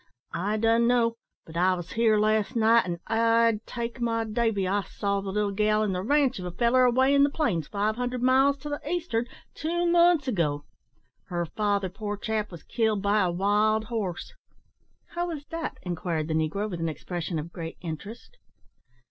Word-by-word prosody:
"I 200 +6 -1
dun 230 +1 +3
know; 240 -1 +3 0.3
but 160 - -13
I 185 +2 +3
was 175 -1 -7
here 225 -2 +3
last 215 +2 +1
night, 230 0 +4
an' 170 -1 -4
I'd 230 -1 +2
take 235 +1 -5
my 230 -1 0
davy, 220 -3 0
I 200 +2 +1
saw 200 0 -2
the 195 - -5
little 205 +1 0
gal 215 +1 +2
in 205 -3 0
the 180 - -2
ranche 270 +1 +2
of 180 - -6
a - - -3
feller 240 +7 +3
away 260 +3 +3
in 280 - +5
the 285 - +5
plains, 215 - -1
five 210 +2 -1
hundred 250 0 -2
miles 265 +2 +4
to 295 - -6
the 290 - -3
east'ard, 295 -8 -2 0.2
two 345 +3 -1
months 340 -4 +4
ago. 150 - -1 0.6
Her 175 -1 -2
father, 200 +2 0
poor 205 +2 -5
chap, 215 0 -2
was 170 -4 -11
killed 220 -4 0
by 205 +1 +3
a 185 - +2
wild 210 +4 +2
horse." 210 -6 -4 0.8
"How 345 0 -2
was 305 -4 -6
dat?" 330 0 -5
inquired 170 -3 -3
the - - 0
negro, 160 +7 0
with 180 -5 -5
an 165 0 -1
expression 170 +2 -4
of 155 +3 -6
great 165 -1 -6
interest. 200 - -8
215 Hz, 190 wpm, -27 LUFS, 185-240 Hz, 0.8 s, in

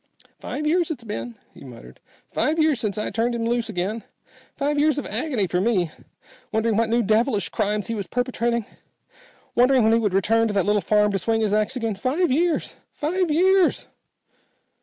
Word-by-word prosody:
"Five 300 - -5
years 340 +2 +2
it's 285 -7 -5
been," 120 - -6 0.2
he - - -14
muttered. 115 - -13 0.3
"Five 310 +2 -1
years 310 -5 +2
since 210 -2 -3
I 215 - -3
turned 235 +1 0
him 230 -1 -2
loose 235 -1 -1
again. 210 +3 -3 0.5
Five 290 0 0
years 300 0 +3
of 290 - -3
agony 255 -11 -1
for 180 0 -1
me, 190 -7 +1 0.6
wondering 220 0 +1
what 225 +1 +1
new 235 +1 +2
devilish 215 +1 +1
crimes 210 -1 -1
he 230 - -3
was 200 -4 -4
perpetrating, 235 0 -1 0.9
wondering 250 0 +4
when 220 +1 +4
he 230 - +4
would 205 -4 0
return 225 +4 +2
to 210 - -3
that 195 - +2
little 210 0 +2
farm 210 0 +2
to 195 - -1
swing 225 +4 0
his 210 -2 0
ax 215 +4 +1
again. 225 -3 -2
Five 270 - 0
years 330 +4 0
five 350 +4 -1
years." 370 +4 +3
230 Hz, 185 wpm, -23 LUFS, 210-275 Hz, 0.9 s, wondering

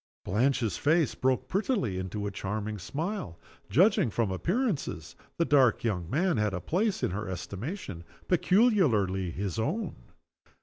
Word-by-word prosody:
Blanche's 115 -2 +1
face 155 -1 +2
broke 130 0 0
prettily 190 - 0
into 95 +3 -4
a 100 - -2
charming 105 +2 -4
smile. 155 - -4 0.3
Judging 185 - +4
from 110 -2 0
appearances, 165 - -2 0.2
the 170 - +2
dark 135 -6 +4
young 90 -7 -1
man 170 - +1
had 105 -2 +1
a - - -2
place 195 - 0
in - - +1
her 105 +1 -4
estimation 100 - -5 0.2
peculiarly 155 - +3
his 95 +2 -3
own. 190 - -2
120 Hz, 135 wpm, -29 LUFS, -, 0.3 s, Judging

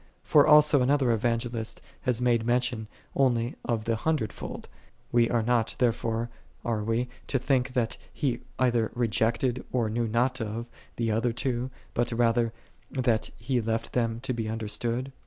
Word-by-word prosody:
1 - - -22
Kor 145 -2 +7
also 150 -2 +7
another 130 -2 +3
Kvangelist 115 0 -1 0.3
liath 125 -1 +1
made 120 -2 +3
mention 120 -2 +1 0.3
only 120 -2 +2
of 115 -2 -1
the 115 -1 +1
hundred 150 -4 0
told: - - -7 0.4
we 120 -1 +4
arc 115 -2 +1
not, 120 -2 +2
tiu 125 - +4
ret'ore, 115 +1 -2 0.4
are 110 -3 0
we, 115 +3 0 0.2
to 135 - +1
think 130 -1 +1
that 120 -3 0
he 130 -6 -1 0.2
either 120 -3 +2
rejeeted, 120 +1 +1
or 115 -4 +1
knew 115 +1 0
not 125 +3 +1
of, 110 +2 -3 0.3
tin 115 -1 0
other 115 +3 +1
two, 125 +1 -2 0.2
but 120 0 0
rather 115 0 +2 0.4
that 120 -4 +1
he 120 +2 0
left 115 +1 -2
them 115 -2 0
to 130 0 -2
be 115 -2 -2
understood 115 +4 -2
120 Hz, 165 wpm, -28 LUFS, 115-125 Hz, 0.4 s, Kor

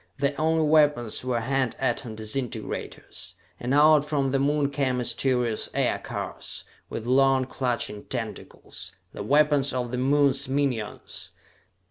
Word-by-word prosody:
Their 140 +1 +1
only 160 0 +3
weapons 150 -8 +3
were 125 -2 0
hand 130 0 0
atom 120 -3 -1
disintegrators. 110 +3 -5 0.2
And 125 - -3
out 150 +1 +6
from 145 -3 0
the 135 - +2
Moon 145 0 +1
came 135 -3 0
mysterious 125 -2 0
aircars, - - -3 0.3
with 115 - -5
long 135 +1 +4
clutching 120 -5 -2
tentacles - - -6 0.2
the - - -6
weapons 145 +3 +3
of 125 -2 -2
the 125 - -2
Moon's 140 0 +3
minions! 130 -6 -2
135 Hz, 125 wpm, -26 LUFS, 125-145 Hz, 0.3 s, out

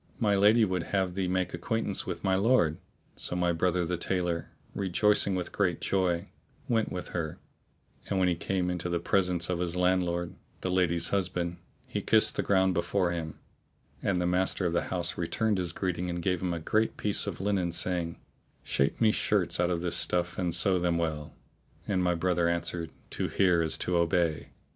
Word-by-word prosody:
My 105 -3 +2
lady 105 +3 +5
would 95 -3 -1 0.2
have 95 -2 0
thee 95 0 -1
make 90 0 -1
acquaintance 115 -3 -2
with - - -4
my 95 -1 +2
lord." 95 -6 +3 0.4
So - - -4
my 90 -1 +2
brother 90 +1 +1
the 90 +1 -2
tailor, 85 -2 -1 0.2
rejoicing 100 +1 +2
with 90 -2 -3
great 90 -5 0
joy, 90 -3 0 0.4
went 115 -2 +1
with 90 - -5
her; 80 -3 -3 0.7
and 100 - 0
when 95 -1 +3
he 90 - +3
came 90 +1 -1
into 90 0 -3
the 85 - 0
presence 90 -1 +1
of 90 -2 -1
his 90 -1 -1
landlord, 90 -1 +1 0.3
the 95 - -2
lady's 85 -2 +2
husband, 90 -2 -1 0.3
he - - -3
kissed - - +3
the - - +1
ground 95 -1 +3
before 90 +1 0
him, 80 -2 -4 0.6
and 95 -3 0
the 90 - 0
master 90 +1 +1
of 85 - 0
the 85 - 0
house 90 -1 +1
returned 105 +4 0
his 90 -2 -1
greeting 90 0 -2
and 85 0 -3
gave 90 -1 0
him 90 -1 -1
a - - -3
great 110 +7 0
piece 105 0 0
of 100 - -4
linen 95 -3 0
saying, 85 -1 -1 0.4
"Shape 70 - 0
me 110 -2 +5
shirts - - 0
out 90 0 +2
of 85 -2 -1
this 90 -1 -1
stuff 90 0 0
and 90 -2 0
sew 90 +1 +3
them 85 -1 +1
well;" 80 -3 -3 0.5
and 95 -3 +1
my 90 -1 +2
brother 85 0 +1
answered, 85 -1 -1 0.2
"To - - -1
hear 90 -4 +3
is 80 - +1
to 90 -1 0
obey." 85 -2 +1
90 Hz, 190 wpm, -29 LUFS, 85-95 Hz, 0.7 s, lady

